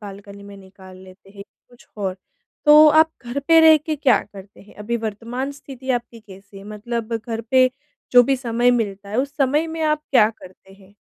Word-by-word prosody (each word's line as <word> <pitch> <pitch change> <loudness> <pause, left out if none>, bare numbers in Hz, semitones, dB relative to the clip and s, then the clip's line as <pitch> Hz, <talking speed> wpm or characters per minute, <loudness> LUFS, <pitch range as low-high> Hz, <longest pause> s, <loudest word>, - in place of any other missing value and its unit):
Balcony 200 0 -12
में 200 0 -13
निकाल 190 -1 -16
लेते 190 +1 -17
हैं 200 0 -12 0.3
कुछ 245 -1 -22
और 190 -3 -4 0.5
तो 300 0 +7
आप 315 +1 +4
घर 240 +3 -5
पे 330 0 +6
रह 320 -1 +7
के 305 0 -5
क्या 270 -3 +3
करते 200 0 -15
हैं? 200 - -19
अभी 220 +3 -4
वर्तमान 235 +5 -5
स्थिति 265 -2 -9
आपकी 235 -2 -4
कैसी 195 -1 -15
है, 195 - -13
मतलब 220 +2 -6
घर 230 -1 -4
पे 255 -1 +4 0.4
जो 245 - +7
भी 270 +2 0
समय 240 -1 0
मिलता 205 -4 -3
है, 210 - -5
उस 280 +2 -3
समय 290 +3 0
में 325 0 -6
आप 305 -1 0
क्या 225 -5 +4
करते 190 -2 -17
हैं? 195 0 -21
230 Hz, 200 wpm, -20 LUFS, 200-270 Hz, 0.5 s, तो